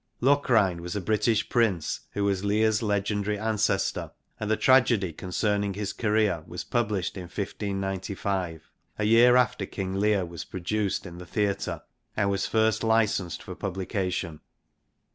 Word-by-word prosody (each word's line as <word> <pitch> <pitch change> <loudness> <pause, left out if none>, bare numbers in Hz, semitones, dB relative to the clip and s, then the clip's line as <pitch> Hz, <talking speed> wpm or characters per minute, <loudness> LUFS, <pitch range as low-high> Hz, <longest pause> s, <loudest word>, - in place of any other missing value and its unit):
Locrine 120 -10 +3
was 90 +2 -5
a - - 0
British 110 +2 +1
prince, 105 -10 +1
who 100 - -1
was 100 -1 0
Lear's 110 +2 +2
legendary 105 0 0
ancestor, 105 -2 0 0.3
and 105 - -3
the 110 - +2
tragedy 120 -9 +4
concerning 100 +3 -1
his 105 -1 -3
career 105 -6 +1
was 90 - -6
published 105 -6 -1
in 90 -2 -6
(59]}} 95 -2 -3 0.4
a 105 - -1
year 115 +3 +6
after 125 0 +2
King 95 -1 -4
Le'ir 105 -2 +2
was 85 -1 -7
produced 100 +3 -2
in 90 -1 -9
the 90 - -10
theatre 100 -1 -1 0.3
and 100 -1 +2
was 100 0 -1
first 110 0 +2
licensed 110 -6 +1
for - - -7
publication. 95 -4 -3
100 Hz, 145 wpm, -27 LUFS, 95-110 Hz, 0.4 s, year